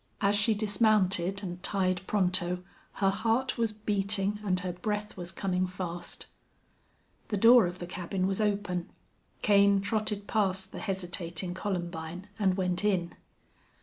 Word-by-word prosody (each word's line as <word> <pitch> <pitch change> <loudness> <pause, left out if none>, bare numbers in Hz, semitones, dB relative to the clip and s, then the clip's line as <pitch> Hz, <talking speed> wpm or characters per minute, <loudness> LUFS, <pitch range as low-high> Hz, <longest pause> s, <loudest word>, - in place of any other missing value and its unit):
As 200 0 +3
she 210 +2 +3
dismounted 200 -3 +2
and 175 -1 -5
tied 185 -2 +1
Pronto 180 -2 +1 0.3
her 195 -1 +2
heart 225 +5 0
was 230 -2 +2
beating 205 -1 0
and 185 -3 0
her 180 -1 -3
breath 210 +3 -3
was 175 -2 -6
coming 185 -2 -1
fast. 180 -1 -6 1.0
The 210 - -1
door 230 -1 +7
of 175 +1 -6
the 175 - -6
cabin 185 +1 -3
was 195 +2 0
open. 200 -4 -1 0.5
Kane 200 -1 +5
trotted 210 0 -1
past 190 -3 0
the - - -7
hesitating 175 -2 -3
Columbine 175 -1 -4
and 190 -2 +2
went 180 0 0
in. 185 -5 +1
195 Hz, 140 wpm, -29 LUFS, 180-210 Hz, 1.0 s, door